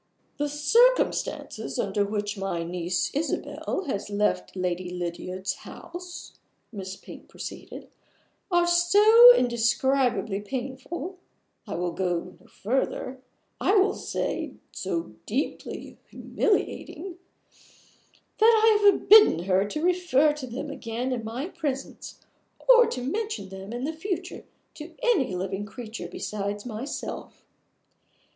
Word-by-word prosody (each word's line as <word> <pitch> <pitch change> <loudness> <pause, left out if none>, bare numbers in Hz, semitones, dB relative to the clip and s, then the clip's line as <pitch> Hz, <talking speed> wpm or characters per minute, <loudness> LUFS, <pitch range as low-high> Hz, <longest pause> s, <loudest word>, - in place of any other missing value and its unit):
"The 290 0 -1
circumstances 460 +13 +1
under 205 - 0
which 205 0 -2
my 195 -4 -3
niece 175 0 -2
Isabel 320 +5 -2
has 205 -8 -3
left 210 -1 0
Lady 180 -1 -2
Lydiard's 180 +2 -4
house," 350 0 -10 0.3
Miss 190 -3 -6
Pink - - -13
proceeded, - - -9 0.6
"are 350 -2 +3
so 410 +8 +8
indescribably 240 - +1
painful 270 - -5 0.5
I 205 - -4
will 175 0 -1
go 180 0 -2
further, 255 +2 -2 0.4
I 400 - +2
will 395 0 +4
say - - -3 0.2
so 170 - -4
deeply 260 +7 -4
humiliating 375 -4 -2 1.2
that 445 0 +6
I 435 -2 +5
have 400 - +5
forbidden 415 - +7
her 190 +1 +2
to 305 +9 -4
refer 345 -5 +3
to 295 -3 -7
them 270 +5 -5
again 250 -1 -4
in 240 -3 -2
my 235 +8 -4
presence, 295 -7 -5 0.5
or 485 -1 +8
to 250 - -4
mention 435 - -3
them 190 +2 -9
in 240 +2 -4
the 310 +4 -2
future 360 +3 -5 0.3
to 320 +2 -10
any 300 - +2
living 190 +3 -3
creature 220 -4 -7
besides 205 0 -4
myself. 240 +4 -6
255 Hz, 115 wpm, -26 LUFS, -, 1.2 s, so